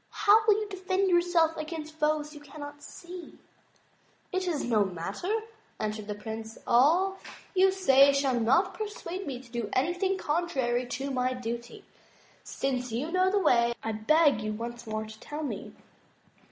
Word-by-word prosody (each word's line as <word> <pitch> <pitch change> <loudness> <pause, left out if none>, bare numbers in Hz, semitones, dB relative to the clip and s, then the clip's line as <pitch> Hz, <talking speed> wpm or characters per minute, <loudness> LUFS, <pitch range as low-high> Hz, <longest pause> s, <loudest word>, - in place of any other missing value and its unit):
How 430 +1 +5
will 425 - +7
you 425 0 -2
defend 380 0 0
yourself 345 -2 +3
against 310 0 -5
foes 300 -1 0
you 295 - -10
cannot 290 0 -9
see?" 350 +4 -10 0.9
It 370 -1 -1
is 320 -5 -1
no 220 -4 +3
matter," 190 - -4 0.5
answered 215 -1 -3
the 210 - -3
Prince, 220 +1 -7
"all 345 +11 +4 0.3
you 380 0 +5
say 280 -8 +6
shall 275 -3 +1
not 240 - +3
persuade 390 -3 -5
me 260 -3 -4
to 250 -2 -16
do 235 -3 -3
anything 355 +7 +1
contrary 270 -8 0
to 270 +3 -3
my 255 0 0
duty. 235 0 -6 0.6
Since 255 -2 -2
you 265 +9 -2
know 370 +1 +3
the 405 - +1
way 235 -10 +3
I 225 - -1
beg 280 +3 +3
you 215 0 -2
once 235 +2 -6
more 215 0 -3
to 215 0 -11
tell 295 +6 -6
me." 290 - -5
285 Hz, 160 wpm, -29 LUFS, 235-350 Hz, 0.9 s, will